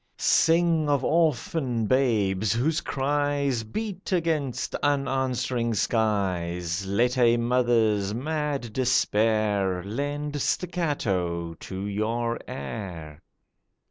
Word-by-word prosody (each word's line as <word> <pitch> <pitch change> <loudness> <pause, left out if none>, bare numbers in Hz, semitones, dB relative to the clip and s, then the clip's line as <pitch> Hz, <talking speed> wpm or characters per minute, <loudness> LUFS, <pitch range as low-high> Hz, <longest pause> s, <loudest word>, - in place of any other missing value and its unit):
Sing 165 -2 +3
of 140 -2 +2
orphan 150 -6 +1
babes, 110 -5 +2
whose 150 +8 +1
cries 140 -2 0
Beat 195 - -5
against 160 -7 -1
unanswering 130 -4 0
skies; 95 -5 -1
Let 120 +6 +1
a 120 -1 +5
mother's 115 -4 +2
mad 140 -1 -3
despair 105 -6 +1
Lend 145 +7 -3
staccato 100 - -1
to 95 +4 -7
your 115 +3 -1
air. 80 0 -7
120 Hz, 85 wpm, -26 LUFS, 100-145 Hz, -, a